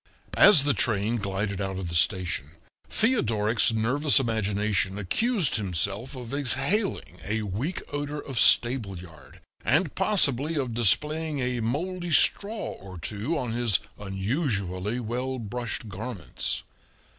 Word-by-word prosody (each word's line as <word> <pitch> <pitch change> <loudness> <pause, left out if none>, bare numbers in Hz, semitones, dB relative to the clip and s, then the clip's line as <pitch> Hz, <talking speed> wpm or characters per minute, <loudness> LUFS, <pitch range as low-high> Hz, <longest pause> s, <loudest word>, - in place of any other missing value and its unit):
As 175 -9 +8
the 145 0 +2
train 110 +1 0
glided 100 -1 -3
out 95 -1 -3
of 95 -2 -4
the 85 - -6
station 85 -4 0 0.4
Theodoric's 115 - +1
nervous 130 +7 +3
imagination 105 -4 -1
accused 185 - 0
himself 100 - -2
of 125 -1 -8
exhaling 140 - 0
a 110 +2 -2
weak 110 - -3
odor 145 +1 -3
of 135 -5 -4
stable 120 -6 +3
yard, 80 -5 -14 0.2
and 155 +4 +1
possibly 165 - +2
of 130 -5 -2
displaying 150 +7 +1
a 125 -2 -1
moldy 175 +10 -3
straw 205 +7 +2
or 95 -1 -11
two 105 - -3
on 125 -4 -2
his 115 -4 +2 0.2
unusually 100 - -2
well 125 +3 -3
brushed 120 0 -4
garments. 105 0 -4
115 Hz, 125 wpm, -26 LUFS, 100-145 Hz, 0.4 s, As